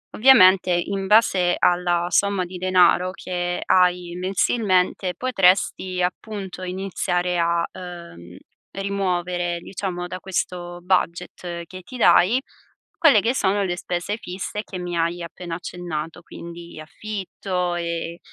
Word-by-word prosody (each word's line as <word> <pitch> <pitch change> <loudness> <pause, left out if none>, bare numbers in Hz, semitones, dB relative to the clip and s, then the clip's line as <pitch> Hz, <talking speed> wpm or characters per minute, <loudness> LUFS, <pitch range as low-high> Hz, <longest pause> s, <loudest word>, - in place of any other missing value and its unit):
Ovviamente, 195 -7 +6
in 195 +3 -1
base 190 -4 +4
alla 175 -1 +2
somma 200 +2 +2
di 180 +1 -8
denaro 185 0 +3
che 180 -1 -3
hai 180 -1 +2
mensilmente, 185 -1 +1
potresti, 185 -4 +1
appunto, 190 0 -4
iniziare 180 -1 -2
a, 170 0 +2
uhm, 170 - -10 0.4
rimuovere, 180 -3 -1
diciamo, 180 -2 -4
da 185 +1 -6
questo 180 -1 -4
budget 175 -1 -1
che 185 +2 -10
ti 255 - -11
dai, 235 +1 +5 0.6
quelle 290 -10 +6
che 240 +5 0
sono 200 -3 +1
le 180 -2 -1
spese 175 +3 -3
fisse 195 +1 -5
che 190 - -8
mi 175 -1 -4
hai 170 +1 0
appena 170 0 -7
accennato, 175 -2 -6
quindi 170 -1 -10
affitto, 185 0 -4
e 170 0 -4
180 Hz, 120 wpm, -22 LUFS, 175-190 Hz, 0.6 s, Ovviamente